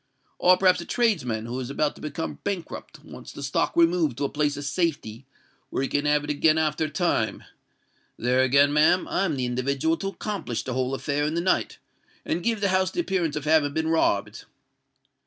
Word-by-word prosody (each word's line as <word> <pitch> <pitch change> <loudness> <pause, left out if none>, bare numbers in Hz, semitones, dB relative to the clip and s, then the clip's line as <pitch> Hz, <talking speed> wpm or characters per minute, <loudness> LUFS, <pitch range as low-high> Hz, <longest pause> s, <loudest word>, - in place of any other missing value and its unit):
Or 180 0 +5
perhaps 185 -2 +3
a - - -8
tradesman 140 - 0
who 120 +2 -4
is 125 -1 -5
about 145 +1 0
to - - -16
become 160 +2 -5
bankrupt, 190 -5 -5
wants - - -11
the 140 - -8
stock 140 - 0
removed 165 -6 +3
to 145 - -2
a - - -1
place 145 -1 -1
of 145 - -5
safety 140 -7 -2 0.4
where - - -2
he - - 0
can 145 +2 -1
have 150 0 +2
it 150 - -2
again 155 +2 +3
after 155 0 0
a - - -4
time: 155 -8 -1 0.7
there 125 +2 +2
again, 140 +2 +4
ma'am, 155 +5 +3
I'm 185 -5 0
the 130 -2 -2
individual 135 +6 0
to 195 - -4
accomplish 195 - -4
the 130 - -4
whole 130 +1 -1
affair 145 +2 -1
in 155 - -2
the - - +1
night, 185 +2 0 0.5
and 170 - -1
give 225 +1 -1
the 200 - +2
house 185 0 +2
the - - -5
appearance 180 - -1
of 150 -1 -4
having 150 -2 +3
been 160 0 0
robbed. 160 -11 0
150 Hz, 205 wpm, -25 LUFS, 135-175 Hz, 0.7 s, Or